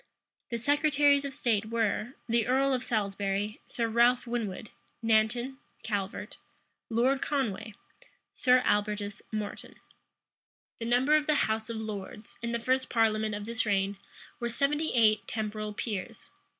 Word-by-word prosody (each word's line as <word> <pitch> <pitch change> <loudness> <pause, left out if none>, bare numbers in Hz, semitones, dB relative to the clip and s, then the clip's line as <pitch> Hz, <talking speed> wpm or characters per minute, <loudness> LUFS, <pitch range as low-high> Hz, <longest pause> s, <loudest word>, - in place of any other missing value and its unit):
The 235 - -2
secretaries 285 +2 +3
of 280 - -3
state 230 -6 0
were, 225 0 0 0.2
the 230 -1 +2
earl 270 +2 +3
of 255 -1 -1
Salisbury, 205 -1 -1
Sir 230 -1 -1
Ralph 240 +3 +4
Winwood, 225 -4 -4 0.3
Nanton, 235 +4 +2 0.3
Calvert, 205 0 -3 0.5
Lord 250 +4 +2
Conway, 220 -7 -2 0.6
Sir 250 0 +4
Albertus 205 -1 0
Moreton. 215 -2 -5 1.0
The 230 - -4
numbers 260 +6 +4
of 295 - -12
the 305 - +3
house 220 +1 -2
of 230 - -3
lords, 210 -1 -7
in 235 0 -2
the 235 - +1
first 260 +3 0
parliament 220 -2 +2
of 205 0 -5
this 230 0 -1
reign, 200 -1 0 0.4
were 235 - -1
seventy 295 +5 0
eight 215 -3 +4
temporal 215 -1 -3
peers. 205 -2 -5
225 Hz, 135 wpm, -29 LUFS, 210-250 Hz, 1.0 s, Ralph